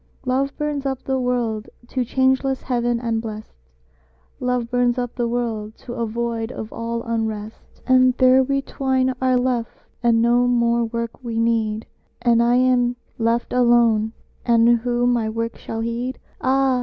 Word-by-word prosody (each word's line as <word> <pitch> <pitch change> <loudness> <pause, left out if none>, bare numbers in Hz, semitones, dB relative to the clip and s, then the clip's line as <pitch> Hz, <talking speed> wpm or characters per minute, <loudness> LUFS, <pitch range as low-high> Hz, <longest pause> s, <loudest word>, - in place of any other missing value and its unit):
Love 270 +2 0
burns 295 -2 -2
up 265 -2 -3
the 265 -1 -1
world 240 -4 -1 0.2
to 255 0 -1
changeless 265 +2 +1
heaven 240 -2 0
and 230 -2 -1
blest, 215 -1 -7 0.9
"Love 250 -1 -1
burns 245 0 +2
up 245 -1 -2
the 240 -1 -1
world 230 -3 -3
to 240 - -9
a 235 -2 -2
void 230 0 -3
of 220 -3 -7
all 230 0 -3
unrest." 220 -2 -4
And 255 -1 +4
there 255 0 +6
we 275 +1 0
twain 260 -1 0
are 255 -1 +3
left, 245 -2 -2 0.2
and 235 -1 +3
no 240 +1 +3
more 235 -1 +2
work 235 +2 -5
we 230 -2 -4
need: 225 -1 0 0.3
"And 235 -1 +3
I 240 +1 +3
am 250 -1 +3 0.2
left 230 +1 0
alone, 235 -3 +3 0.3
and 235 -1 +4
who 240 +1 0
my 240 -3 +1
work 230 +1 -3
shall 225 0 -5
heed?" 235 +3 -3 0.2
Ah! 265 -1 +2
240 Hz, 160 wpm, -21 LUFS, 230-255 Hz, 0.9 s, there